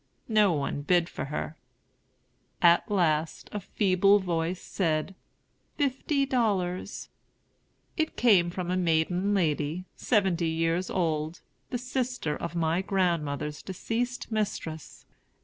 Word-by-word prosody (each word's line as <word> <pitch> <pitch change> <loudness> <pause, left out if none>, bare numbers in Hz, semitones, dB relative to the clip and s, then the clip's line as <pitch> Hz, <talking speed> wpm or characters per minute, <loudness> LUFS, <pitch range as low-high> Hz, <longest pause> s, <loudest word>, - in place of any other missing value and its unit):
No 210 -3 +5
one 145 -1 -2
bid 175 +3 +3
for - - -5
her. 150 +2 -4 1.0
At 170 -1 +5
last 165 -5 0
a 210 - -2
feeble 195 0 +3
voice 175 -2 -1
said, 160 -1 -1 0.6
"Fifty 280 0 +1
dollars." 200 -9 -1 0.9
It 315 -1 -1
came 195 -8 +5
from 180 0 -3
a 185 - +1
maiden 180 +3 +1
lady, 160 0 0
seventy 190 -7 +1
years 165 +3 0
old, 160 -2 -1 0.3
the 250 - -1
sister 250 - -2
of 170 - -5
my 165 +1 +1
grandmother's 165 -6 -1
deceased 230 +6 -3
mistress. 195 -7 -3
180 Hz, 115 wpm, -28 LUFS, 160-205 Hz, 1.0 s, No